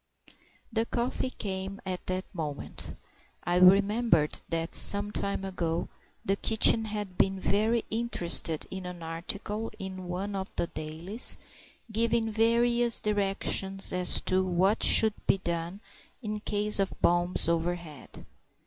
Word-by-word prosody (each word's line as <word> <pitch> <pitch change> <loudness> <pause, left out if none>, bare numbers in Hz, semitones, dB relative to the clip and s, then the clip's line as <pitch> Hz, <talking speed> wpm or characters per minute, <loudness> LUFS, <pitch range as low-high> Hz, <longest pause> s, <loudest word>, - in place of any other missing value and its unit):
The 225 0 0
coffee 245 +1 -2
came 195 -3 -5
at 185 -1 -6
that 185 0 -2
moment. 150 -5 -6 0.5
I 175 0 0
remembered 195 -2 +3
that 165 0 -3
some 205 0 +7
time 200 -1 -3
ago 170 -3 -3 0.4
the 195 - +1
kitchen 220 +1 +4
had 210 -3 -6
been 195 0 +1
very 215 +4 0
interested 175 -8 0
in 190 -1 -6
an 175 -2 -9
article 200 +7 -5
in 185 -1 -7
one 190 +3 -4
of 190 0 -5
the - - 0
dailies, 165 +8 -2 0.5
giving 225 0 0
various 235 +1 +3
directions 195 -2 0
as 180 0 +4
to 185 0 +2
what 185 +4 +1
should 220 -1 +5
be - - +3
done 170 +2 -4 0.4
in 215 -1 -4
the 210 - -5
case 210 0 0
of 195 -1 -2
bombs 175 0 +2
overhead. 170 -4 -4
195 Hz, 130 wpm, -28 LUFS, 175-215 Hz, 0.5 s, some